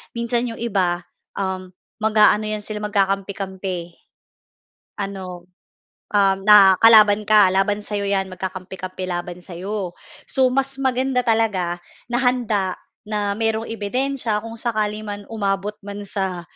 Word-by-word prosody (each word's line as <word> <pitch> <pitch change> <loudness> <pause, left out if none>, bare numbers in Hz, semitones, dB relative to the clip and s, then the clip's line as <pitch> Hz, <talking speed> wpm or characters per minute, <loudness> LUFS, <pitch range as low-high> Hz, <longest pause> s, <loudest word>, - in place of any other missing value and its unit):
minsan 235 +1 -1
yung 230 - -5
iba, 185 -6 0 0.3
uhm, 190 -1 -3 0.3
mag-aano 215 -1 +4
yan 215 -1 -3
sila, 210 0 -5
magkakampi-kampi. 195 -3 -2 1.1
Ano, 185 -3 -6 0.6
uhm, 195 -2 +3
na 200 -2 +8
kalaban 215 -2 +7
ka 205 -3 +6
laban 205 +2 +1
sa'yo 205 -1 -2
'yan 195 -1 +1
magkakampi-kampi 185 0 -6
laban 175 -1 -4
sa'yo. 185 +1 -5 0.3
So, 260 -1 +2
mas 270 +1 0
maganda 260 0 +1
talaga 215 -7 +1 0.3
na 240 - 0
handa 235 -7 +1 0.3
na 210 -1 -2
mayroong 225 0 -1
ebidensiya 225 +1 -1
kung 225 +1 -8
sakali 215 -2 -2
man 205 -1 -7
umabot 205 -1 -2
man 205 0 -6
sa, 190 -3 -2
205 Hz, 125 wpm, -21 LUFS, 190-225 Hz, 1.1 s, na